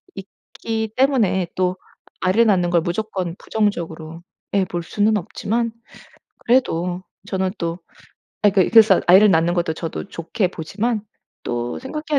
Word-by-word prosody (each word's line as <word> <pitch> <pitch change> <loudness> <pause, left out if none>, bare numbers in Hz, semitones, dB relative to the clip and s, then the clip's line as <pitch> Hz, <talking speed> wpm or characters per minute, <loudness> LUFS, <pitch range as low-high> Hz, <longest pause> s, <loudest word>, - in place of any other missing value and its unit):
있기 220 +3 -6
때문에 240 -9 +2
또 185 0 0 0.4
아이를 195 +6 +3
낳는 180 -4 +3
걸 175 -1 +3
무조건 180 -1 -3
부정적으로 170 -6 -3 0.3
예 200 -1 +3
볼 175 -1 -4
수는 210 +5 +1
없지만 230 +5 -2 0.7
그래도 180 -8 +1 0.2
저는 190 -2 -1
또 170 +1 -3 0.6
아 205 - +6
그 190 -2 +3
그래서 220 -5 +7
아이를 195 +4 +7
낳는 165 0 +3
것도 170 -2 0
저도 165 +4 -6
좋게 180 +4 -2
보지만 210 +7 -3 0.4
또 120 0 -3
생각해야 300 +2 -2
190 Hz, 280 characters per minute, -21 LUFS, 170-220 Hz, 0.7 s, 그래서